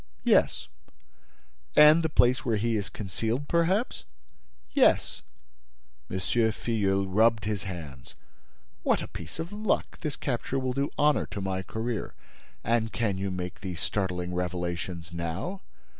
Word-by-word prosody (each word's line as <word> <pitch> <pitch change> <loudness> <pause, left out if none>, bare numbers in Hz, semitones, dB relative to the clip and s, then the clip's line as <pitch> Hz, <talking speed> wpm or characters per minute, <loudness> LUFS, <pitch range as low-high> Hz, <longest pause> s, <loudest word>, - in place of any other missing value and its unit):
"Yes." - - +3 1.1
"And 150 +2 +8
the 160 - 0
place 130 0 +3
where 115 -5 +1
he 115 +2 +1
is 105 -2 -2
concealed, 110 +7 -3
perhaps?" 180 +8 +1 0.7
"Yes." - - +3 0.9
M. 95 - -2
Filleul 105 -2 +1
rubbed 110 +2 +3
his 105 -2 -2
hands. 75 -9 -8 0.7
"What - - +2
a - - -6
piece - - -8
of 165 +5 -5
luck! 210 -1 -1
This 150 -3 -3
capture 130 0 -2
will 130 -1 -1
do 140 +2 0
honor 150 0 +3
to - - -6
my 95 -1 -2
career. 110 +4 -4 0.5
And 115 -1 +1
can 105 -5 -1
you 100 0 -1
make 90 -1 -5
me 95 - -4
these 85 -3 -5
startling 90 -3 -2
revelations 90 -1 -3
now?" 85 - -3
110 Hz, 140 wpm, -28 LUFS, 90-130 Hz, 1.1 s, And